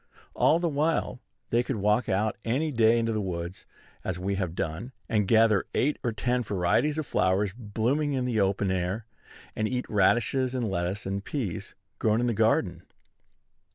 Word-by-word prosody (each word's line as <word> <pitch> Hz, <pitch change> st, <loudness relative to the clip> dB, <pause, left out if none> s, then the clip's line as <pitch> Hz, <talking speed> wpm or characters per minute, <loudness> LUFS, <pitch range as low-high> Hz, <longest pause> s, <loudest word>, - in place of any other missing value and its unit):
All 160 Hz, -, +4 dB
the 170 Hz, 0 st, 0 dB
while 150 Hz, -3 st, 0 dB, 0.3 s
they 120 Hz, -, +4 dB
could 130 Hz, +1 st, -3 dB
walk 105 Hz, +3 st, +1 dB
out 105 Hz, +3 st, +1 dB
any 140 Hz, +7 st, 0 dB
day 115 Hz, -2 st, +4 dB
into 115 Hz, -1 st, 0 dB
the 110 Hz, -, -1 dB
woods, 85 Hz, -1 st, -5 dB, 0.4 s
as 90 Hz, -, -3 dB
we 95 Hz, +2 st, -2 dB
have 90 Hz, -4 st, -2 dB
done, 90 Hz, +12 st, -4 dB
and 105 Hz, -3 st, +1 dB
gather 110 Hz, -1 st, +4 dB
eight 145 Hz, +3 st, +1 dB
or 120 Hz, -, 0 dB
ten 125 Hz, +3 st, 0 dB
varieties 105 Hz, -, +1 dB
of 155 Hz, -, -2 dB
flowers 95 Hz, -1 st, +1 dB
blooming 125 Hz, +6 st, -1 dB
in 130 Hz, -2 st, 0 dB
the 115 Hz, -4 st, +1 dB
open 95 Hz, 0 st, +1 dB
air, 95 Hz, +4 st, -2 dB, 0.5 s
and 110 Hz, -, 0 dB
eat 125 Hz, +2 st, -2 dB
radishes 120 Hz, +5 st, +2 dB
and 120 Hz, -5 st, -1 dB
lettuce 90 Hz, +3 st, -2 dB
and 100 Hz, +1 st, -3 dB
peas 110 Hz, -, -4 dB, 0.2 s
grown 110 Hz, +1 st, +2 dB
in 120 Hz, -, +1 dB
the 120 Hz, -, +1 dB
garden. 100 Hz, -5 st, +1 dB
110 Hz, 175 wpm, -27 LUFS, 95-125 Hz, 0.5 s, All